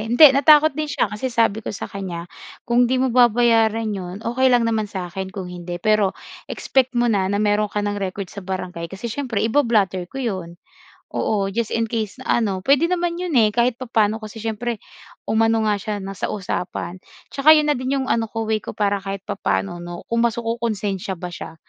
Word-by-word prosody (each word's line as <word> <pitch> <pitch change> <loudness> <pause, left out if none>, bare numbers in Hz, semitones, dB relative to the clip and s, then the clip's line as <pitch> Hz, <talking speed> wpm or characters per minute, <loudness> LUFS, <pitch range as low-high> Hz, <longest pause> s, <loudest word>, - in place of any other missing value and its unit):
Hindi, 265 +5 +8
natakot 300 +2 +6
din 305 +2 -3
siya 255 - 0
kasi 210 +5 -2
sabi 230 -3 +1
ko - - -7
sa - - -5
kanya, 180 -4 -6 0.4
"Kung 240 0 +3
'di 260 - +1
mo 255 -1 +1
babayaran 225 -2 +3
'yon, 185 -1 -5
okey 260 +3 +2
lang 245 -2 +4
naman 220 -2 0
sa 180 -3 -6
akin 190 -1 -4
kung 190 -1 -6
hindi. 175 0 -6
Pero 210 +1 +1 0.3
expect 260 -1 0
mo 240 - +3
na 200 -5 +1
na 200 - 0
meron 210 0 +2
ka 210 0 -2
ng 205 0 -2
record 190 0 -4
sa 200 - -7
barangay 185 -3 -5
kasi 200 +5 -6
siyempre 245 -7 -2
iba-blotter 215 -8 +1
ko 270 - -11
'yon." 180 -6 -4 0.6
Oo, 200 -2 0
just 225 +2 -2
in 230 0 +1
case 220 +1 -3
na 235 - +1
ano, 195 -3 -1
puwede 280 - +4
naman 350 -1 -1
'yon 360 -3 -3
eh 215 -2 +5
kahit 240 0 +2
papaano, 220 -4 +1
kasi 215 +1 -8
siyempre 225 +1 -3 0.5
umano 225 0 +2
nga 210 -1 +1
siya 210 +1 -4
na 195 - -6
sa 195 - -3
usapan. 185 -2 -4 0.3
Tsaka 305 +3 +6
yun 300 -1 +3
na 295 - +3
din 255 +2 -1
yung 260 - -4
ano 230 -1 +1
ko, 225 0 -3
way 220 0 +1
ko, - - -6
para 205 -1 +1
kahit 195 -1 -5
papaano 95 - -1
'no, 175 0 -7
kung 230 0 +2
mas 235 0 +1
kokonsensya 215 -5 -2
ba 180 0 -6
siya. 170 - -8
220 Hz, 205 wpm, -21 LUFS, 195-240 Hz, 0.6 s, Hindi